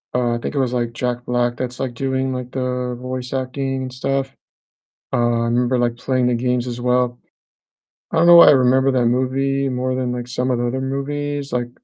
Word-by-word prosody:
uh, 120 -1 +1
I - - -1
think 130 - -5
it - - +1
was, 125 -2 0
like, 120 -2 -1
Jack 125 0 -3
Black 120 0 0
that's, 125 -1 -5
like, 130 -2 -3
doing, 130 +1 -1
like, 125 -1 -5
the 125 -1 -2
voice 125 0 -5
acting 135 0 -2
and 130 -1 -6
stuff. 135 +1 -2 0.8
Uh, - - +1
I 120 -1 +2
remember, 120 +2 +1
like, 120 -1 0
playing 130 0 0
the 125 - +2
games 125 +1 -1
as 120 0 -5
well. 125 0 +1 0.9
I - - 0
don't 165 +1 +4
know 175 - +9
why 170 - +10
I - - +9
remember 130 0 +4
that 125 -2 +1
movie 135 +2 0
more 130 0 -1
than 130 -1 -1
like 125 0 -4
some 125 +1 -1
of 120 - 0
the 120 - 0
other 130 +2 -2
movies, 145 +1 -3
like 120 -1 -2
125 Hz, 220 wpm, -20 LUFS, 125-135 Hz, 0.9 s, why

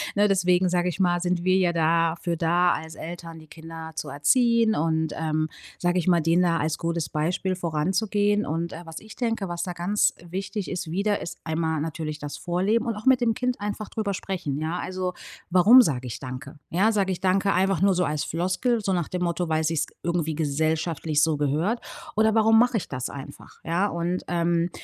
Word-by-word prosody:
ne, 205 +1 +4
deswegen 180 -2 +3
sage 180 0 +1
ich 180 - -6
mal, 175 -1 +2
sind 175 -1 -1
wir 185 0 +3
ja 180 -2 +2
dafür 165 +1 +1
da 175 +2 +2
als 160 0 -6
Eltern, 165 0 -8
die 155 - -15
Kinder 160 0 -9
zu 150 - -4
erziehen. 230 - +3
Und, 160 0 0
ähm, 155 -1 -1 0.3
sage 175 +1 +1
ich 170 - -3
mal, 175 -2 +4
denen 165 +3 +3
da 170 -1 +2
als 155 0 -1
gutes 170 -1 -2
Beispiel 175 +4 -1
voranzugehen. 195 +5 0
Und, 165 +2 -3
äh, 170 - -7
was 165 0 -8
ich 220 0 -13
denke, 225 -5 -1
was 175 0 -3
da 180 - -4
ganz 180 +5 +1
wichtig 195 +3 -4
ist, 180 -2 -4
wieder, 200 +3 0
ist - - -6
einmal 160 -1 -1
natürlich 155 -1 -4
das 145 -1 -6
Vorleben 195 +7 0
und 230 - -1
auch 210 +3 -9
mit 260 -1 +5
dem 230 -2 +2
Kind 250 +2 -2
einfach 205 +1 -4
drüber 215 -3 -2
sprechen, 180 -7 -3
ja? 160 +3 -2
Also, 185 -1 -3 0.4
warum 205 +8 +8
sage 130 - -1
ich 115 - -6
„danke“? 135 +3 -8
Ja, 195 +6 +3
sage 200 -3 +1
ich 180 - -3
„danke“ 195 +1 +2
einfach 190 -1 +1
nur 195 -1 +4
so 180 -1 +1
als 150 -1 -1
Floskel, 185 - 0
so 195 -2 0
nach 175 -3 0
dem 180 -1 -3
Motto, 170 -1 -1
weil's 155 0 +1
sich 160 -1 0 0.2
irgendwie 170 -2 -1
gesellschaftlich 155 +1 0
so 160 -2 +2
gehört. 155 - 0 0.3
Oder 220 +1 +3
warum 225 0 +5
mache 245 0 +3
ich 200 - -4
das 130 -2 -4
einfach? 140 0 -10
Ja 175 +5 +1
und, 170 +1 -2
ähm, 170 0 +1
175 Hz, 205 wpm, -25 LUFS, 160-195 Hz, 0.4 s, warum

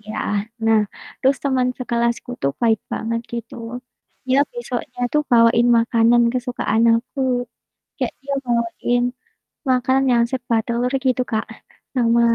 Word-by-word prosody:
Iya, 215 0 -8 0.5
nah 225 -1 +5 0.4
terus 270 +1 +3
teman 260 -2 +2
sekelasku 235 -1 -1
tuh 140 - +1
baik 225 -2 +3
banget 230 +1 -2
gitu, 235 -1 -6 0.7
dia 260 +2 +4
besoknya 265 - -5
tuh 300 - +3
bawain 235 0 +5
makanan 235 +1 +4
kesukaan 245 -3 0
aku. 250 +4 -3 0.8
Kayak - - -2
dia 280 +1 -4
bawain 240 +1 0 0.7
makan 260 +1 +3
yang 235 - +4
serba 245 -3 -1
telur 245 +2 -1
gitu, 255 -1 +2
Kak, 220 +1 0 0.5
sama 235 -2 +3
240 Hz, 125 wpm, -21 LUFS, 230-255 Hz, 0.8 s, nah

